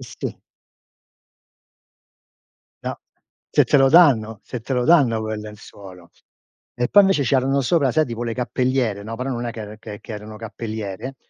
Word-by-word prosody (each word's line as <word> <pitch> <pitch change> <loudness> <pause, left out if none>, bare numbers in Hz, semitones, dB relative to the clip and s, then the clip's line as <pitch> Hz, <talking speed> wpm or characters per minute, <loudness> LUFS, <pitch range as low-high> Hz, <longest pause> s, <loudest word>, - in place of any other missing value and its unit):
Eh - - -12
sì. - - -7 2.5
No, - - -4 0.5
se - - +4
te - - +3
lo 135 -1 +5
danno 125 - +5
se 125 - -7
te 115 - -5
lo 125 -1 +1
danno 130 -8 +4
quel 110 -1 -4
lenzuolo. 100 -4 -12 0.6
E 120 - 0
poi 205 - +7
invece 195 -7 +2
c'erano 135 +1 +2
sopra, 140 0 +2
sai 155 +3 +2
tipo 115 0 -5
le 115 -1 -3
cappelliere, 125 -4 -1
no, 115 +2 -6
però 130 +3 -3
non 120 -2 -3
è - - -2
che 105 -1 -8
che 105 -2 -9
che - - -9
erano 105 0 -8
cappelliere, 110 +2 -6
120 Hz, 165 wpm, -21 LUFS, 110-135 Hz, 2.5 s, poi